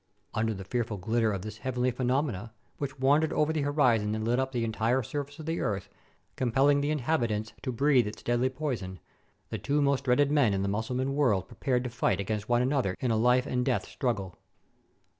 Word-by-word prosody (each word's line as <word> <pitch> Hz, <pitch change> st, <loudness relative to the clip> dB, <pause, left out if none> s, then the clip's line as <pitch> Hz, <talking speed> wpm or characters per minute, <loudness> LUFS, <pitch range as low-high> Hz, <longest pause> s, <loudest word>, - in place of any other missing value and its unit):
Under 110 Hz, -1 st, 0 dB
the 95 Hz, -, -7 dB
fearful 115 Hz, 0 st, -2 dB
ghtter 110 Hz, +4 st, +1 dB
of 95 Hz, -3 st, -3 dB
this 110 Hz, 0 st, -7 dB
heavenly 125 Hz, 0 st, 0 dB
phe 125 Hz, -, -16 dB
nomenon, 125 Hz, -5 st, 0 dB, 0.3 s
which 140 Hz, -2 st, -4 dB
wandered 145 Hz, +4 st, +3 dB
over 155 Hz, +1 st, +1 dB
the 155 Hz, -, 0 dB
horizon 125 Hz, -8 st, +2 dB
and 110 Hz, 0 st, -3 dB
lit 120 Hz, +2 st, +2 dB
up 130 Hz, 0 st, -1 dB
the 120 Hz, -3 st, -1 dB
entire 115 Hz, +3 st, +1 dB
surface 145 Hz, +4 st, -5 dB
of 155 Hz, -, -8 dB
the 165 Hz, +1 st, -2 dB
earth, 100 Hz, -4 st, -2 dB, 0.5 s
compelling 135 Hz, +3 st, +3 dB
the 145 Hz, -, 0 dB
inhabit 150 Hz, -4 st, +1 dB
ants 105 Hz, 0 st, -3 dB
to 130 Hz, -, -3 dB
breathe 130 Hz, -2 st, +3 dB
its 105 Hz, +1 st, -8 dB
deadly 120 Hz, +2 st, +1 dB
poison, 125 Hz, -, -4 dB, 0.5 s
the -, -, -3 dB
two 145 Hz, +1 st, 0 dB
most 140 Hz, -1 st, +1 dB
dreaded 140 Hz, +3 st, +3 dB
men 135 Hz, -9 st, +3 dB
in 95 Hz, -, -1 dB
the -, -, 0 dB
Mussulman 125 Hz, +6 st, -1 dB
world 120 Hz, -10 st, +2 dB
prepared 125 Hz, -2 st, -1 dB
to 125 Hz, -, -4 dB
fight 125 Hz, -, 0 dB
against 105 Hz, +2 st, -3 dB
one 120 Hz, 0 st, +3 dB
another 125 Hz, -8 st, 0 dB
in 125 Hz, -, 0 dB
a -, -, +2 dB
life 125 Hz, +3 st, +3 dB
and 125 Hz, -3 st, 0 dB
death 130 Hz, -1 st, 0 dB
struggle. 105 Hz, -, -2 dB
125 Hz, 210 wpm, -29 LUFS, 110-140 Hz, 0.5 s, wandered